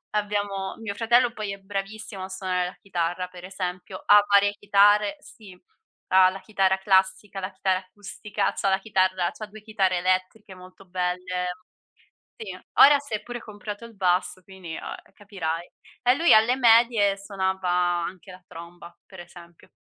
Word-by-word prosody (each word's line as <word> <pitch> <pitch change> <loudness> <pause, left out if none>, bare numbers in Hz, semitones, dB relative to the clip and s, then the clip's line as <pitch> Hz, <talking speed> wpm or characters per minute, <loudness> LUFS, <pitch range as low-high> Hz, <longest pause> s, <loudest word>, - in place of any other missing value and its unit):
abbiamo 205 -2 -2
mio 225 -2 -5
fratello 240 +2 +3
poi 215 -3 -5
è - - -8
bravissimo 195 0 -6
a - - -5
suonare 185 -1 -2
la 180 - -9
chitarra 180 -1 -2
per 180 -1 -13
esempio. 185 0 -6
Ha 205 0 +7
varie 200 0 +5
chitarre, 205 +3 +3
sì. 210 -11 -15 0.5
Ha 185 0 +7
la 190 +1 -7
chitarra 190 -3 +1
classica, 190 +1 +1
la 185 +1 -5
chitarra 190 0 0
acustica, 200 +2 -4
c'ha 195 - -1
la 190 - +3
chitarra 185 -3 0
c'ha 215 - -9
2 215 +1 -13
chitarre 195 -4 0
elettriche 185 +3 -1
molto 185 +1 -15
belle. 180 0 -3 0.9
Sì. 445 - -7 0.3
Ora 285 0 +8
si 285 -6 -10
è 210 - -6
pure 240 0 -7
comprato 210 +1 -8
il 230 -2 -14
basso, 180 -1 0
quindi, 185 -4 -9
uhm, - - -7
e - - -26
capirai. 175 -5 -5 0.3
E 250 +1 +4
lui 335 +4 +5
alle 225 +3 +4
medie 230 -4 +4
suonava 190 -2 -3
anche 175 +1 -1
la 180 0 -14
tromba, 170 +1 -12
per 190 -2 -11
esempio. 175 -1 -15
190 Hz, 165 wpm, -25 LUFS, 185-210 Hz, 0.9 s, Ora